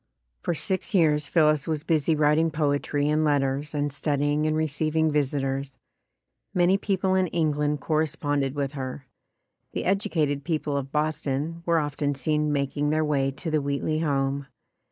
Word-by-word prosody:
For 175 - -1
six 190 +5 -1
years 150 -4 +3
Phillis 155 -2 +3
was 155 -2 -2
busy 160 -1 +2
writing 150 +2 +3
poetry 145 -1 0
and 155 +1 +2
letters 145 0 0
and 145 -1 -1
studying 145 +1 0
and 155 0 +1
receiving 155 +1 +1
visitors. 135 -2 -1 0.8
Many 180 +1 +4
people 190 -2 0
in 185 -1 +2
England 150 -3 0
corresponded 145 -3 0
with 140 -2 -1
her. 135 -1 -6 0.7
The - - -3
educated 165 -8 0
people 150 -2 -1
of 135 -1 -3
Boston 155 +1 -1
were 170 -1 +3
often 145 -1 -1
seen 150 +2 0
making 145 +1 0
their 155 +1 +1
way 140 -2 +1
to 150 +5 -5
the 155 -1 +2
Wheatley 140 +2 -1
home. 140 -2 0
150 Hz, 150 wpm, -26 LUFS, 140-160 Hz, 0.8 s, Many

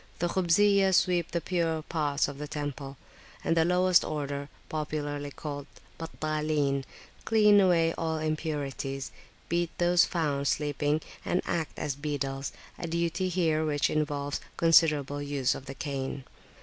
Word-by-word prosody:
The 175 - 0
Khubziyah 190 +2 +4
sweep 175 -3 +2
the 170 - -2
purer 165 -2 -1
parts 150 -3 0
of 140 0 -7
the 150 - -4
temple, 145 -2 -5 0.5
and 165 - +1
the 165 - +4
lowest 180 +1 +4
order, 145 -1 -3 0.2
popularly 145 -2 -3
called 145 0 -6 0.3
"Battalin," 155 -4 -1 0.4
clean 210 -2 +5
away 170 -4 +4
all 160 -1 -1
impurities, 145 -3 -3 0.4
beat 170 0 0
those 175 -1 +4
found 145 -5 -1
sleeping, 145 +1 0 0.2
and 180 - 0
act 160 -3 -2
as 150 -3 -2
beadles, 140 -2 -3 0.3
a 170 - -3
duty 170 +2 -1
here 165 -3 +1
which 150 -2 +1
involves 145 -2 -1 0.2
considerable 150 -4 +4
use 140 -3 0
of 135 - -9
the 135 - -6
cane. 135 -2 -4
155 Hz, 135 wpm, -29 LUFS, 145-170 Hz, 0.5 s, clean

